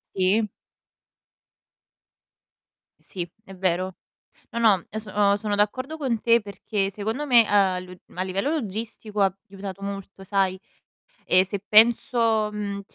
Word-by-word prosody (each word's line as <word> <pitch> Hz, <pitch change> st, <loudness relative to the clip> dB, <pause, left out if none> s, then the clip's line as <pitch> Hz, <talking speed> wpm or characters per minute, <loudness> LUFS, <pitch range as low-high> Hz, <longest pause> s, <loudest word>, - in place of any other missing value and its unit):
Sì. 195 Hz, +4 st, +3 dB, 2.5 s
Sì, 175 Hz, -2 st, -6 dB, 0.2 s
è 195 Hz, -3 st, -12 dB
vero. 185 Hz, 0 st, -1 dB, 0.6 s
No, 235 Hz, -, -3 dB
no, 210 Hz, -6 st, +4 dB
e 215 Hz, -, -4 dB
so 215 Hz, -1 st, -10 dB
o 200 Hz, -1 st, +3 dB
sono 205 Hz, 0 st, -1 dB
d'accordo 255 Hz, +9 st, -1 dB
con 260 Hz, -7 st, -1 dB
te 235 Hz, 0 st, +4 dB
perché 200 Hz, -1 st, -3 dB
secondo 220 Hz, +8 st, -3 dB
me, 245 Hz, -4 st, +7 dB
uhm, 220 Hz, -, -2 dB
a 195 Hz, -3 st, +3 dB
lu 180 Hz, 0 st, -10 dB, 0.2 s
a 180 Hz, -, -2 dB
livello 190 Hz, +8 st, -1 dB
logistico 220 Hz, -5 st, -3 dB
ha 195 Hz, -1 st, +3 dB
aiutato 195 Hz, 0 st, -8 dB
molto, 195 Hz, -1 st, -7 dB
sai. 190 Hz, -1 st, 0 dB, 0.7 s
E 185 Hz, +1 st, +4 dB
se 195 Hz, +1 st, -4 dB
penso, 225 Hz, 0 st, +4 dB
mhmm, 200 Hz, -1 st, -4 dB
205 Hz, 140 wpm, -25 LUFS, 190-225 Hz, 2.5 s, me